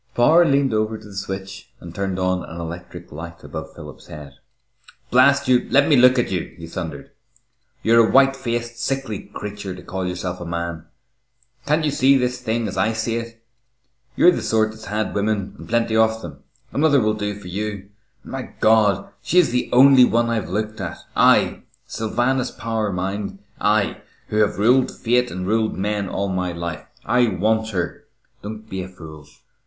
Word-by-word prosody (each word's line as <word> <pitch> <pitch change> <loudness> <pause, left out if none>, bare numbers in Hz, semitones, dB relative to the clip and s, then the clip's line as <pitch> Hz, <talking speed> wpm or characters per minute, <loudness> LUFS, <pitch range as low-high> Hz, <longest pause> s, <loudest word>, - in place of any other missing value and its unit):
Power 160 +8 +5
leaned 140 -4 +2
over 110 0 0
to 110 - -14
the 100 - -12
switch 95 +1 -6
and 85 -1 -10
turned 95 0 -2
on 90 0 0
an 85 - -8
electric 85 +1 -8
light 85 +3 -9
above - - -8
Philip's - - -11
head. 75 -2 -10 0.8
"Blast 140 +2 +5
you, 125 -1 +3
let 140 +1 +4
me 150 - +5
look 125 0 +6
at 120 - 0
you!" 90 -3 -3
he 85 - -8
thundered. 80 -4 -7 0.7
"You're 115 0 +5
a - - -2
white 135 0 +5
faced, 120 -2 -4
sickly 130 -3 -3
creature 105 -2 -6
to 90 - -12
call 95 0 -4
yourself 90 0 -4
a - - -5
man! 85 -1 -4 0.8
Can't 155 +2 +2
you 150 - +1
see 135 0 +4
this 125 -1 -1
thing 115 -1 -1
as - - -6
I 110 +1 +2
see 110 +1 -1
it? 115 0 -8 0.7
You're 180 - +6
the - - -2
sort 110 -1 +1
that's 110 0 -12
had 105 +1 -2
women, 105 -1 -1
and - - -11
plenty 115 -1 +1
of 110 0 +2
them. 70 -4 -10 0.3
Another 145 -1 +4
will 110 -2 +1
do 105 -1 -3
for 100 -3 -11
you, 100 +1 -5 0.3
and, - - -11
my - - -3 0.2
God! 110 -3 +3
she 180 - -1
is 180 -7 +5
the 125 0 -1
only 130 +1 +7
one 115 -1 +2
I've 115 -2 -2
looked 105 +2 -3
at 85 -3 -5 0.2
I, - - +4 0.2
Sylvanus 120 +4 -1
Power, 110 -2 -3
mind 95 +2 -3 0.2
I, 105 -1 +1 0.3
who 105 - -2
have 105 -1 +2
ruled 125 +5 +4
fate 125 +1 0
and 90 -3 -5
ruled 110 +2 0
men 100 0 -2
all 100 +1 -2
my 90 -2 -2
life 85 -3 -6 0.2
I 125 -1 +3
want 110 +3 0
her! 90 -5 -4 0.4
Don't 110 +1 -8
be 95 -3 -4
a 90 - -6
fool! 80 -5 -12
110 Hz, 185 wpm, -21 LUFS, 95-120 Hz, 0.8 s, only